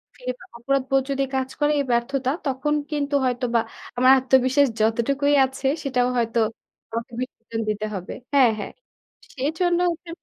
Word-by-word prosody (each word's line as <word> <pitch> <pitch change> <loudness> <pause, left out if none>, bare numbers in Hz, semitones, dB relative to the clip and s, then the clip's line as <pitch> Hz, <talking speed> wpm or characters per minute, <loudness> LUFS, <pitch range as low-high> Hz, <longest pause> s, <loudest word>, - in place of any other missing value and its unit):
কি 250 - -19 0.3
অপরাধবোধ 270 +2 +1
যদি 275 0 0
কাজ 265 0 -1
করে 295 0 +3
এই 280 - 0
ব্যর্থতা, 255 +2 0 0.2
তখন 275 +2 0 0.2
কিন্তু 290 -1 -1
হয়তোবা 245 -1 +1 0.4
আমার 255 +1 +6
আত্মবিশ্বাস 260 +2 +3
যতটুকুই 265 +6 +2
আছে 265 +1 -4 0.2
সেটাও 250 -3 +1
হয়তো 230 0 +1 0.5
আমাকে 230 +1 -5
বিসর্জন 230 -3 -5
দিতে 210 0 -2
হবে। 185 -1 -6 0.2
হ্যাঁ, 260 -5 +6
হ্যাঁ। 205 - -5 0.6
সেজন্য 325 +6 0
হচ্ছে 340 +1 -9
260 Hz, 140 wpm, -23 LUFS, 235-280 Hz, 0.6 s, আমার